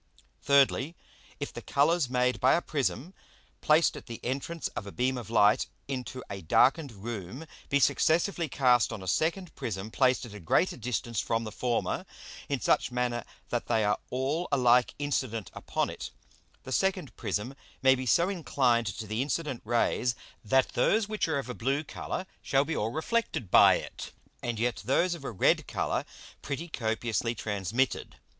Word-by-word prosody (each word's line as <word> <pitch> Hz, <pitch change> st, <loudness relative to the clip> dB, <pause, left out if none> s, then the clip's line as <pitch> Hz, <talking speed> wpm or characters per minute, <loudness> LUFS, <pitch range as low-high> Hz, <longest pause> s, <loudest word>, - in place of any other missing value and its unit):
Thirdly, 140 Hz, +2 st, +3 dB, 0.4 s
If -, -, -5 dB
the -, -, -7 dB
Colours 145 Hz, 0 st, +2 dB
made 125 Hz, 0 st, +1 dB
by 130 Hz, -, +5 dB
a 170 Hz, -, +1 dB
Prism 150 Hz, +3 st, -2 dB, 0.5 s
placed 155 Hz, +2 st, +4 dB
at -, -, -10 dB
the 115 Hz, -2 st, -7 dB
entrance 140 Hz, +6 st, -2 dB
of 100 Hz, -, -6 dB
a -, -, -6 dB
Beam 130 Hz, +4 st, 0 dB
of 120 Hz, -3 st, -6 dB
Light 105 Hz, -1 st, +4 dB, 0.2 s
into 130 Hz, -1 st, -5 dB
a 100 Hz, -1 st, -6 dB
darken'd 135 Hz, -, +3 dB
Room 110 Hz, -, -7 dB, 0.2 s
be 140 Hz, -, +3 dB
successively 165 Hz, +4 st, +2 dB
cast 125 Hz, -4 st, +3 dB
on 95 Hz, -, -6 dB
a -, -, -8 dB
second 170 Hz, -, 0 dB
Prism 105 Hz, -1 st, -5 dB
placed 130 Hz, 0 st, +2 dB
at 115 Hz, -, -10 dB
a 105 Hz, -, -8 dB
greater 100 Hz, -, +2 dB
distance 120 Hz, -2 st, -2 dB
from 115 Hz, 0 st, 0 dB
the 110 Hz, -, -6 dB
former, 120 Hz, 0 st, -1 dB, 0.4 s
in 140 Hz, -2 st, 0 dB
such 115 Hz, -, +2 dB
manner 125 Hz, -1 st, -1 dB, 0.3 s
that 120 Hz, -, -2 dB
they 110 Hz, -3 st, +2 dB
are 105 Hz, -, +1 dB
all 140 Hz, +7 st, -1 dB
alike 125 Hz, -2 st, +4 dB
incident 130 Hz, -7 st, -2 dB
upon -, -, -2 dB
it, -, -, -7 dB, 0.5 s
the 130 Hz, -, -8 dB
second 185 Hz, -, 0 dB
Prism 105 Hz, +4 st, -3 dB, 0.3 s
may 130 Hz, 0 st, +7 dB
be 130 Hz, 0 st, -3 dB
so 170 Hz, +9 st, +4 dB
inclined 130 Hz, -, +1 dB
to 105 Hz, +2 st, -4 dB
the 110 Hz, +3 st, -2 dB
incident 145 Hz, -2 st, -2 dB
Rays, 120 Hz, +1 st, +1 dB, 0.3 s
that 130 Hz, +5 st, +3 dB
those 220 Hz, 0 st, +2 dB
which 215 Hz, -3 st, -1 dB
are 160 Hz, -3 st, 0 dB
of 135 Hz, -, -3 dB
a 125 Hz, -, -4 dB
blue 135 Hz, +5 st, -1 dB
Colour 185 Hz, -, -5 dB, 0.2 s
shall 135 Hz, +1 st, +2 dB
be 165 Hz, -, -2 dB
all 105 Hz, -, 0 dB
reflected 160 Hz, -, -2 dB
by -, -, +8 dB
it, -, -, -7 dB, 0.3 s
and 120 Hz, -2 st, -2 dB
yet 120 Hz, +2 st, 0 dB
those 170 Hz, -, +2 dB
of 170 Hz, -5 st, -8 dB
a -, -, -3 dB
red 105 Hz, -6 st, +2 dB
Colour -, -, -1 dB, 0.4 s
pretty 145 Hz, +4 st, -4 dB
copiously 115 Hz, -3 st, -1 dB
transmitted. 105 Hz, +5 st, -1 dB
125 Hz, 175 wpm, -29 LUFS, 115-145 Hz, 0.5 s, by